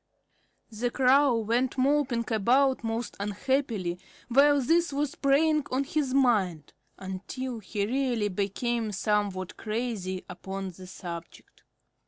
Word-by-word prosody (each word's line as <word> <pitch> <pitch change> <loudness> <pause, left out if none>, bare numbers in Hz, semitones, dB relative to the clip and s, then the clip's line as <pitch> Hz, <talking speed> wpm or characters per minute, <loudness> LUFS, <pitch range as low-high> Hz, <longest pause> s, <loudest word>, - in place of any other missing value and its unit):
The 230 +3 -1
Crow 260 0 +4
went 235 +4 0
moping 265 -3 +2
about 255 +5 +3
most 225 +1 -3
unhappily 205 -3 -1 0.3
while 285 +3 +5
this 330 +4 +2
was 285 0 -1
preying 300 +2 +3
on 260 +2 0
his 285 -1 -1
mind, 210 - +1 0.2
until 225 +6 -5
he 205 0 -2
really 240 -3 0
became 215 +4 -1
somewhat 200 -2 -1
crazy 215 -5 -3
upon 190 +1 -6
the 185 +1 -12
subject. 170 -2 -9
235 Hz, 115 wpm, -28 LUFS, 195-270 Hz, 0.3 s, while